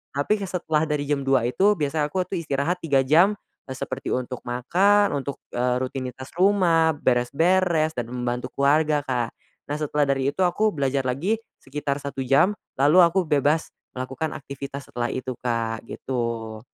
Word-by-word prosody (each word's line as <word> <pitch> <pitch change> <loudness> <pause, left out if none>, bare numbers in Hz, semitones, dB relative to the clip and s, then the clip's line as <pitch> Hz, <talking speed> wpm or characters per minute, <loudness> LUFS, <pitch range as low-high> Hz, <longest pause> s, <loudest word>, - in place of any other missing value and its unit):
tapi 205 +10 +1
ke 195 - -3
setelah 160 -4 0
dari 150 -1 0
jam 145 0 0
2.00 135 -2 +2
itu, 195 +12 +3
biasa 150 0 0
aku 185 +3 0
tuh 185 +1 -4
istirahat 155 +4 -1
3 140 -5 +2
jam, 175 +9 +5 0.3
eee, 130 - -6
seperti - - -5
untuk 125 0 -2
makan 190 +12 +3
untuk, 140 0 -5 0.2
eee, 125 +1 +1
rutinitas 130 0 -6
rumah, 170 -5 +4
beres-beres 155 +6 +2
dan 120 -4 -4
membantu 125 0 -3
keluarga 150 +1 +3
Kak. 120 -3 -1 0.4
Nah, 145 - -2
setelah 150 -1 0
dari 135 0 +1
itu 190 - -4
aku 215 +5 +1
belajar 140 -3 0
lagi 140 - 0 0.2
sekitar 140 +1 -3
1 140 -1 -4
jam, 140 +11 +3 0.2
lalu 150 +7 +6
aku 170 +3 +3
bebas 150 +2 +2 0.3
melakukan 130 +4 -4
aktivitas 140 0 -8
setelah 120 0 -2
itu 130 -1 -4
Kak, 115 -2 -1
gitu. 115 -4 -4
140 Hz, 160 wpm, -24 LUFS, 130-165 Hz, 0.4 s, lalu